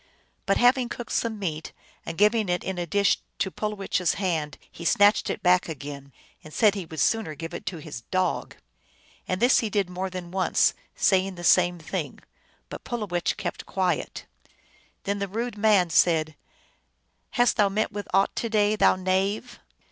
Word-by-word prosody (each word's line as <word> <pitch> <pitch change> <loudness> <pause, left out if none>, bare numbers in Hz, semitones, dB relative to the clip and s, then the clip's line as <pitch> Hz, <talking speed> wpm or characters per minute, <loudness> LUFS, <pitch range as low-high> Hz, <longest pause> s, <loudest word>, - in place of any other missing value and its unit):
But 195 - +3
having 245 0 +3
cooked 240 - -7
some 225 -2 -1
meat, 160 -6 -4 0.3
and 165 - -5
given 210 0 +3
it 180 0 0
in 190 -2 -4
a 175 - -3
dish 200 +4 +2 0.2
to 190 - -1
Pulowech 210 -3 -2
s 175 - +1
hand, 160 -7 -2
he 170 - -10
snatched 205 +4 +4
it - - -4
back 180 -1 +3
again, 140 -2 -7 0.3
and 155 - -12
said 210 +4 +4
he 195 -5 -5
would 160 -1 -7
sooner 210 -1 +1
give 165 +2 -7
it - - -7
to 180 -2 -3
his 150 -6 -8
dog. 185 -2 -1 0.7
And 185 - -1
this 245 +3 +5
he 225 - -1
did 200 -3 -1
more 185 +1 -3
than 180 -2 -7
once, 190 0 +2 0.2
saying 190 0 +2
the 175 - -9
same 175 0 +4
thing. 160 - -5 0.5
But - - -9
Pulowech 205 -8 -2
kept - - -5
quiet. 185 -2 -2 0.8
Then 200 +1 -2
the 200 - -2
rude 230 +4 -4
man 205 -5 +3
said, 160 -2 +3 0.5
" - - -47
Hast 245 -1 +3
thou 205 -2 +4
met 210 +2 -1
with 205 -1 -6
aught 195 +1 +2
to 230 - -1
day, 210 -1 +2
thou 210 - +4
knave 190 +6 -1
190 Hz, 180 wpm, -25 LUFS, 170-210 Hz, 0.8 s, this